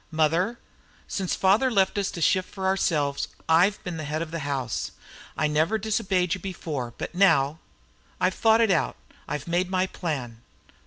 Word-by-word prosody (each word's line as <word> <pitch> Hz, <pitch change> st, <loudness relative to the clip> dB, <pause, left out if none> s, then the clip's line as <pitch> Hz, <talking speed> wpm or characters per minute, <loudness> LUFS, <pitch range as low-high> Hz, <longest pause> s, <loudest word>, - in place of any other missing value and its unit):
"Mother, 165 Hz, +8 st, +1 dB, 0.5 s
since 190 Hz, -3 st, -2 dB
father 205 Hz, +8 st, +3 dB
left 195 Hz, -5 st, +2 dB
us 200 Hz, -2 st, 0 dB
to 170 Hz, -, -6 dB
shift 185 Hz, +3 st, +2 dB
for 190 Hz, -2 st, -5 dB
ourselves 155 Hz, -7 st, +1 dB, 0.2 s
I've 175 Hz, +5 st, +3 dB
been 175 Hz, -2 st, -4 dB
the 155 Hz, -, -4 dB
head 155 Hz, +2 st, -2 dB
of 165 Hz, -, -9 dB
the 165 Hz, -, -3 dB
house. 135 Hz, -5 st, -3 dB, 0.4 s
I 155 Hz, -, +1 dB
never 155 Hz, +7 st, +2 dB
disobeyed 195 Hz, -5 st, 0 dB
you 190 Hz, -, -3 dB
before, 150 Hz, -10 st, -5 dB
but -, -, -5 dB
now 160 Hz, -5 st, +3 dB, 0.6 s
I've 185 Hz, 0 st, +2 dB
thought 225 Hz, +2 st, +4 dB
it 225 Hz, -3 st, +4 dB
out. 170 Hz, -, +1 dB, 0.3 s
I've 150 Hz, 0 st, -4 dB
made 175 Hz, +2 st, 0 dB
my 185 Hz, 0 st, +1 dB
plan." 135 Hz, -11 st, -4 dB
175 Hz, 170 wpm, -26 LUFS, 150-190 Hz, 0.6 s, thought